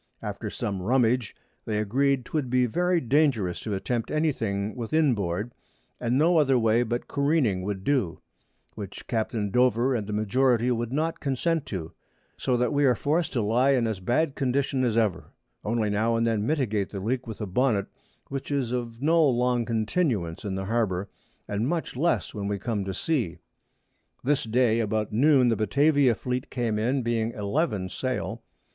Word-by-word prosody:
After - - -4
some 100 -2 -3
Rummage, 120 +1 +1 0.3
they 110 -2 -1
agreed 130 +5 +1
'twould 145 -3 -2
be 125 0 +3
very 175 +8 +1
dangerous 130 - +1
to 105 -3 -3
attempt 115 +4 -2
any 155 +1 +1
thing 100 -4 -3
within 140 +4 +2
board, 100 +2 -3 0.5
and 120 +1 0
no 165 +3 +4
other 135 -3 +3
way 115 0 +3
but 120 0 -2
Careening 140 - +1
would 95 0 -4
do, 125 -11 0 0.5
which 100 -3 -8
Capt. 115 0 -2 0.2
Dover 125 +2 +3
and 110 -5 -2
the - - -4
Majority 120 +3 +2
would 120 -1 -2
not 160 +4 -1
consent 150 +3 -1
to; 85 -5 -5 0.4
so 125 -2 0
that 125 +4 +1
we 145 0 +2
are 125 -2 +4
forc'd 155 +6 0
to 120 -5 0
lie 125 +6 +3
in 125 -3 +2
as 110 -4 -2
bad 125 - +1
a - - -15
condition 135 0 0
as 115 -3 +1
ever, 95 -8 +1 0.4
only 110 -1 0
now 110 +3 +1
and 115 0 +1
then 110 -2 0
mitigate 110 -10 0
the 100 - -6
Leak 120 +5 -2
with 110 - -7
a 105 - -2
Bonnet, 105 0 +1 0.4
which 135 -1 -5
is 135 -5 0
of 120 0 -4
no 165 +2 +4
long 125 -3 +2
continuance 110 - -1
in 100 -3 -3
the 95 0 -3
Harbour, 100 -4 -1 0.4
much 125 +13 -2
less 165 +7 0
when 100 -2 -4
we 100 0 -1
come 105 -1 -2
to 95 - -3
Sea. 125 - -1 0.9
This 140 0 +1
Day 115 0 +2
about 110 -1 -1
Noon 130 +1 +5
the 115 - +2
Batavia 140 +3 +3
Fleet 125 +2 -3
came 115 -4 -1
in, 125 +4 0
being 115 -1 0
11 105 - -1
Sail. 130 +6 -3
120 Hz, 175 wpm, -26 LUFS, 105-135 Hz, 0.9 s, Noon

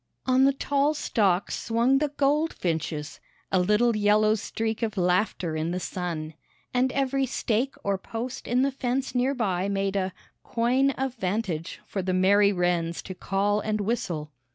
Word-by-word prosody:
On 260 +1 +4
the 275 - +4
tall 285 +2 +1
stalks 200 -9 +1
swung 240 +4 +3
the 300 - +1
goldfinches, 185 - -1 0.3
"a 190 - +3
little 210 +5 +3
yellow 210 +1 +4
streak 220 +1 -3
of 220 -2 -2
laughter 180 -2 +1
in 155 +1 -1
the 180 +1 -2
sun," 170 -4 -4 0.4
and 255 +1 +2
every 270 0 +1
stake 245 +1 -1
or 200 -1 0
post 235 +5 -6
in 250 +2 +2
the 275 - +1
fence 260 0 -2
near 260 +2 +1
by 195 -5 0
made 195 0 -1
a 190 -1 0 0.3
"coigne 250 +4 +2
of 265 -1 -1
vantage" 185 -5 -2
for 195 - -3
the 185 0 -1
merry 200 +2 +5
wrens 175 -2 0
to 190 - -6
call 200 +3 0
and 215 0 -1
whistle. 180 -8 -2
210 Hz, 160 wpm, -26 LUFS, 185-255 Hz, 0.4 s, merry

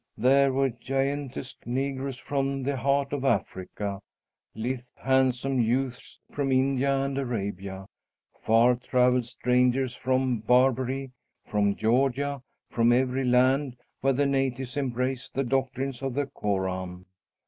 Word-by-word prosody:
There 135 +4 +4
were 135 0 +1
giantesque 135 +1 -3
negroes 135 +1 -2
from 135 0 -2
the 140 +1 -1
heart 140 +2 0
of 140 -2 -2
Africa; 100 -4 -2 0.6
lithe, 120 +3 -2 0.2
handsome 130 0 +1
youths 125 +2 -2
from 140 -2 -1
India 135 +1 +2
and 135 0 -2
Arabia; 100 -6 -4 0.6
far 115 +3 +4
travelled 125 0 +2
strangers 125 +1 +1
from 130 -1 0
Barbary, 130 +3 +2 0.3
from 100 -1 +1
Georgia, 135 +4 +1 0.3
from 115 0 +3
every 130 +1 +1
land 130 +1 +2 0.2
where 135 0 +2
the 140 +2 +1
natives 135 -2 -1
embrace 130 -1 -2
the 135 - -1
doctrines 135 0 -2
of 135 -2 -3
the 145 0 0
Koran. 95 -6 -3
130 Hz, 120 wpm, -27 LUFS, 120-135 Hz, 0.6 s, There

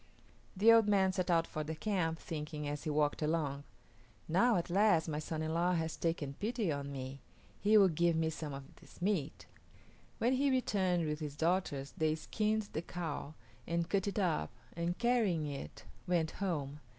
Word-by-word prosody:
The 220 +4 +7
old 225 -2 +6
man 190 -2 +3
set 185 -1 -1
out 165 -1 +3
for 155 - -4
the 160 +1 -4
camp, 165 -3 -1
thinking, 150 -2 -5
as 145 0 -4
he - - -1
walked 150 0 +1
along, 150 -3 -1 0.6
"Now, 220 +9 +4
at 175 0 -1
last, 195 -4 +4
my 150 -1 -2
son 155 0 -3
in 160 0 -2
law 175 +2 +2
has 160 -1 -1
taken 160 -4 -2
pity 220 -4 -1
on 140 -1 -3
me; 135 0 -6 0.4
he 215 +2 +5
will 200 -2 +7
give 170 0 +2
me 160 0 +1
some 155 -1 -5
of 135 0 -6
this - - -17
meat." 175 -6 -1 0.7
When 245 +3 +2
he 275 +2 +2
returned 190 -9 +1
with 150 0 -2
his 150 -2 -5
daughters 160 -4 0
they 155 -1 +1
skinned 215 +5 -1
the 155 - -1
cow 160 -4 -5 0.3
and 170 0 0
cut 200 0 0
it 200 - -2
up 170 - +1 0.3
and, 170 +1 -2
carrying 220 -10 +2
it, 140 - -6 0.2
went 170 -3 +1
home. 150 -7 -3
165 Hz, 185 wpm, -34 LUFS, 150-195 Hz, 0.7 s, The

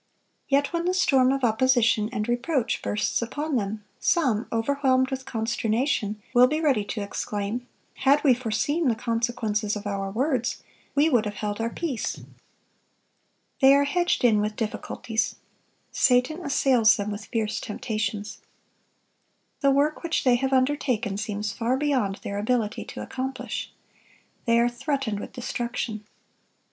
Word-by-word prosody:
Yet 280 +3 +1
when 340 0 -1
the 365 +1 +1
storm 265 -8 +4
of 270 -1 -1
opposition 230 -2 +3
and 210 +1 -2
reproach 245 0 0
bursts 210 +3 -1
upon 290 +5 -3
them, 210 -1 -2 0.2
some, 250 -10 +1
overwhelmed 260 +2 +1
with 265 0 -4
consternation, 225 -1 -1
will 250 0 +7
be 305 +4 -1
ready 275 -10 +2
to 205 0 -4
exclaim, 210 +4 -4 0.3
"Had 280 +2 +3
we 275 -4 +6
foreseen 255 +7 0
the 235 - +2
consequences 230 -2 -1
of 210 0 -6
our 195 -1 -2
words, 255 +2 -1 0.3
we 290 +2 +4
would 245 -8 +3
have 205 -1 -4
held 210 +1 -3
our 230 - 0
peace." 270 -2 -3 1.4
They 270 0 +7
are 280 - +4
hedged 350 +3 +1
in 220 -4 +4
with 210 0 -2
difficulties. 225 0 -2 0.6
Satan 255 +7 +2
assails 255 -6 +4
them 205 0 -3
with 205 +1 -6
fierce 220 -3 -2
temptations. 210 -1 -4 1.2
The 275 - +3
work 285 +3 +2
which 335 -1 -1
they 255 - +4
have 265 +2 -1
undertaken 255 -5 +1
seems 210 0 -3
far 245 +3 0
beyond 265 -9 0
their 200 0 -3
ability 220 -1 -1
to - - -7
accomplish. 265 0 -4 0.7
They 230 -1 +4
are 235 +1 +4
threatened 250 -3 -2
with - - -7
destruction. 235 -3 -4
240 Hz, 145 wpm, -25 LUFS, 215-270 Hz, 1.4 s, will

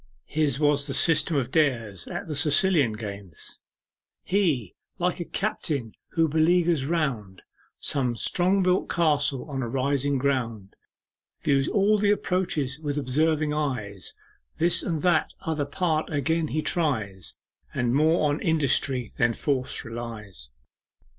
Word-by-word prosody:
His 150 -3 0
was 145 -1 +2
the 135 - -2
system 160 -1 +4
of 130 -2 -1
Dares 115 - 0
at - - -5
the 155 - -4
Sicilian 150 - +4
games 100 -5 -8 0.6
'He, 160 - 0 0.2
like 180 0 -1
a 175 - -3
captain 150 - -2 0.2
who 165 -1 +3
beleaguers 160 -1 +2
round 125 - -2 0.3
Some 125 -4 -1
strong 185 - +1
built 180 0 +1
castle 145 -5 +2
on 135 -3 -4
a 120 - -3
rising 140 +2 0
ground, 115 -7 -2 0.7
Views 140 -1 +2
all 210 +1 +3
the 205 0 +2
approaches 175 -9 0
with 150 -2 -3
observing 150 +3 +1
eyes, 125 -10 -3 0.4
This 170 +1 +3
and 160 -4 -2
that 175 -4 +2
other 155 -3 -2
part 155 +1 -1
again 160 +2 0
he 155 +1 -2
tries, 110 - -1 0.4
And 120 -1 0
more 155 +2 +3
on 145 +1 -1
industry 135 -6 0
than 120 -1 +2
force 135 -3 -2
relies. 110 - -6
145 Hz, 135 wpm, -26 LUFS, 125-160 Hz, 0.7 s, system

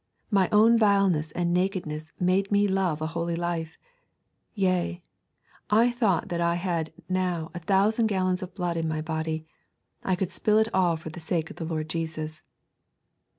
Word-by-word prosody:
My 195 -3 +3
own 225 +2 +6
vileness 195 -7 +3
and 175 -1 0
nakedness 175 -4 -2
made 185 +2 +1
me 205 0 +4
love 185 -5 0
a 160 +1 -3
holy 170 0 -1
life. 170 -1 -3 0.8
Yea, 185 -3 0 0.7
I 230 +3 +4
thought 220 -7 +1
that 170 - -2
had 170 -1 0
I - - -16
now 180 -3 -1
a 175 - -5
thousand 205 +6 +2
gallons 185 -2 0
of 185 0 -7
blood 175 -3 -2
in 165 -1 -1
my 155 -1 -2
body, 160 0 -3 0.6
I 190 - +1
could 185 0 -2
spill 215 0 +2
it 220 +1 +2
all 180 -3 +3
for 160 0 -8
the 175 - -9
sake 160 -1 -2
of - - -12
the 165 - -4
Lord 155 -1 -3
Jesus.' 155 -1 -4
175 Hz, 170 wpm, -27 LUFS, 160-195 Hz, 0.8 s, own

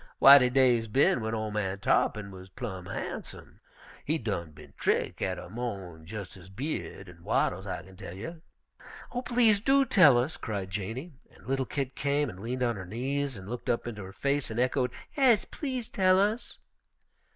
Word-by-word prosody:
W'y, 140 +1 +10
de 125 -1 +3
day's 125 -3 +3
bin 125 +3 +3
w'en 110 0 -2
ol' 110 -1 -3
man 100 -2 -2
Tarr'pin 100 +1 +1
wuz 95 -1 -10
plumb 95 -1 -6
harnsum. - - -7 0.4
He 155 +3 0
done 100 - -3
bin 75 - -15
trick' - - 0
out 95 -1 -1
er - - -8
mo'n 95 -9 -6
jes' 105 -1 -7
his 95 -2 -13
by'ud 105 -3 -5
an' 85 -1 -14
wattles, - - 0
I - - -4
kin 95 -1 -15
tell 90 -3 -8
you." 160 - -7 0.7
"Oh, 245 - -2
please 235 -5 +3
do 270 +5 +4
tell 165 - +6
us!" 130 +7 0
cried 100 -4 -4
Janey, 115 - -4 0.2
and - - -19
little 135 -1 -1
Kit 135 -2 -3
came 145 -2 0
and 90 - -12
leaned 125 +4 -3
on 120 -3 0
her 95 - -6
knees 135 +4 -2
and 95 0 -10
looked 120 +2 -5
up 115 - 0
into 110 -4 -6
her 95 - -9
face 140 +6 -1
and 110 +1 -3
echoed, 125 0 +1 0.3
"'Es, 255 -8 +4
please 260 -6 -4
to - - -14
tell 185 -1 +5
us." 210 +4 0
120 Hz, 195 wpm, -29 LUFS, 100-145 Hz, 0.7 s, W'y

